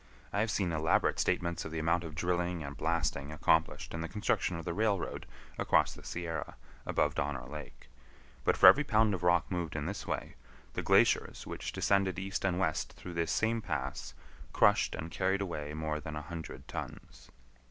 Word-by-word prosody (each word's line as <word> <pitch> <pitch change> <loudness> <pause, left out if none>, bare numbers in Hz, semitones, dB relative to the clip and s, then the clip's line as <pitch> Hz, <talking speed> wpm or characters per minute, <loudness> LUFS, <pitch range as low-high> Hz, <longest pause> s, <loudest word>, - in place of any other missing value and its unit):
I 100 - +1
have 110 +2 +1
seen 95 -4 0
elaborate 80 0 +2
statements 85 0 0
of - - -7
the 80 - -4
amount 85 +2 +1
of 80 -3 -7
drilling 90 0 -1
and 70 0 -6
blasting 80 -2 -1
accomplished 80 +1 +1
in 85 - -3
the 80 - -3
construction 95 -3 0
of 85 - -7
the 85 - -2
railroad 105 -1 -1 0.3
across - - +3
the - - -13
Sierra, 85 -2 -4 0.3
above - - +1
Donner 70 -3 -2
Lake; 75 -1 -9 0.6
but - - +2
for - - +6
every 150 - +9
pound 110 -6 +3
of 90 - -3
rock 90 0 +3
moved 85 -3 -2
in 75 -1 -2
this 100 +5 -4
way, - - -3 0.4
the - - -2
glaciers - - +3
which - - -5
descended 95 -3 +1
east 95 +2 -3
and 90 -2 +1
west 85 -4 -1
through 90 - -9
this 85 -1 0
same 115 0 +1
pass, 70 - -4 0.4
crushed - - +4
and 80 +1 -6
carried 95 +3 +1
away 75 -6 -4
more 80 0 -2
than 75 +1 -6
a 75 - -5
hundred 80 -4 -8
tons. - - -8
85 Hz, 185 wpm, -32 LUFS, 75-95 Hz, 0.6 s, every